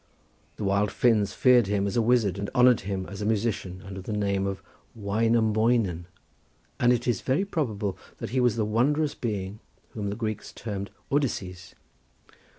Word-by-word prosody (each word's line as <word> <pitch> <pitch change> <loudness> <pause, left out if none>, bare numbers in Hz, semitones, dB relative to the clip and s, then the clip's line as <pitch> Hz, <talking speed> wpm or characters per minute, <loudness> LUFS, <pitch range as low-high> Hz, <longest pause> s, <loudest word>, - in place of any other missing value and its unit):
The - - -6
wild 100 +1 +1
Finns 110 -5 +2
feared 125 -4 +5
him 100 0 0
as 100 - -2
a 120 - +3
wizard 110 -5 +2
and 100 - -3
honoured 125 -1 +6
him 95 -1 -3
as 100 +1 -8
a - - -2
musician 100 -4 -1
under 95 0 -7
the 95 - -6
name 100 -2 0
of 95 -1 -4 0.3
Wainoemoinen, 110 -3 +1 0.7
and 120 0 +4
it 120 0 0
is 120 -5 +1
very 140 +9 +1
probable 110 - -2 0.2
that - - -6
he 130 - +1
was 125 -3 +3
the 110 -2 0
wondrous 145 +8 +1
being 105 -3 -4 0.3
whom 105 -2 -4
the 100 - -3
Greeks 110 -2 -4
termed 100 -3 -5 0.2
Odysses. 95 -11 -2
105 Hz, 165 wpm, -27 LUFS, 100-120 Hz, 0.7 s, honoured